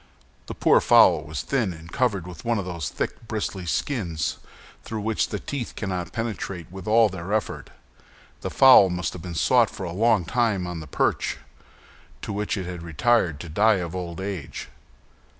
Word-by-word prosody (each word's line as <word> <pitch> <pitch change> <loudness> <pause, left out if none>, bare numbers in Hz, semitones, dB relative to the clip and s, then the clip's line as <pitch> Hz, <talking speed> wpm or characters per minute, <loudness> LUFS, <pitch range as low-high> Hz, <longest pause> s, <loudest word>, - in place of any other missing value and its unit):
The - - -6
poor - - +4
fowl - - +6
was 75 -2 -5
thin, 120 -9 0
and 80 0 -12
covered 105 -9 0
with 90 -3 -10
one 115 -1 +1
of 100 - -3
those 85 -6 -4
thick, 115 - -5
bristly 100 -5 -4
skins 85 - -2 0.5
through 110 -1 -5
which 110 +1 0
the - - -3
teeth 135 -5 -5
cannot 90 -4 -3
penetrate 100 -7 -4
with 95 0 -9
all 115 +1 +5
their 95 -1 -6
efforts. 110 0 -2 0.7
The - - -3
fowl 130 -8 +7
must 90 +1 -2
have 90 - -8
been 90 -1 -7
sought 120 +5 +4
for - - -8
a 85 - -4
long 110 -1 +2
time 110 -6 0
on 90 -1 -5
the 80 - -9
perch, - - 0 0.9
to - - -4
which 105 +1 -2
it 95 - -3
had 90 -1 -6
retired 85 0 +1
to 85 - -8
die 105 +7 +4
of 90 -2 -4
old 90 -1 -5
age. 95 -7 -5
95 Hz, 185 wpm, -24 LUFS, 85-110 Hz, 0.9 s, fowl